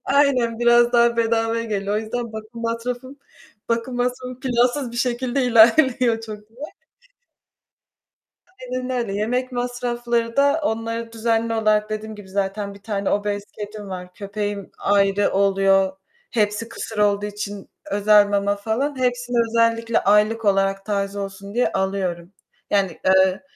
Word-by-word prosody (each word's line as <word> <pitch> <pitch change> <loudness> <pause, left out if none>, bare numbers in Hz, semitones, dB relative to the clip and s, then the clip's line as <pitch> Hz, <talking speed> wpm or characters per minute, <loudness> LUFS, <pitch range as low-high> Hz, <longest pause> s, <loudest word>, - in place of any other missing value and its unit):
Aynen, 260 -5 +2
biraz 240 0 +4
daha 235 0 +4
bedavaya 230 0 +1
geliyor. 205 -2 -2
O - - +2
yüzden 235 +1 -4
bakım 220 +2 -8
masrafım 245 +4 -4 0.5
bakım 235 +2 -1
masrafım 250 +1 -3
plansız 250 +1 +1
bir - - -7
şekilde 250 +2 0
ilerliyor 240 0 +4
çok 210 -1 -9
diye. 225 - -24 2.0
Aynen 255 0 -4
öyle. 240 -5 -2
Yemek 250 +5 -1
masrafları 240 -1 -2
da 285 +3 +3
onları 230 -1 -3
düzenli 230 0 0
olarak 215 -1 +1
dediğim 215 0 -5
gibi 205 -2 -12
zaten 200 +1 -3
1 200 - -16
tane 205 -2 -2
obez 205 0 -1
kedim 210 -1 -8
var, 180 -1 -7
köpeğim 205 -1 -5
ayrı 200 0 +2
oluyor, 195 -1 +3 0.3
hepsi 215 -1 0
kısır 220 -2 -7
olduğu 205 0 +2
için 205 -1 -6 0.2
özel 205 0 +5
mama 200 0 0
falan... 245 +7 -2
Hepsini 245 -1 -1
özellikle 230 0 +2
aylık 210 +3 +2
olarak 195 -1 +1
taze 200 -1 -2
olsun 200 +1 -7
diye 245 - +1
alıyorum. 190 -2 -2 0.4
Yani, 195 -4 0
eee, 190 0 +4
220 Hz, 135 wpm, -22 LUFS, 200-240 Hz, 2.0 s, özel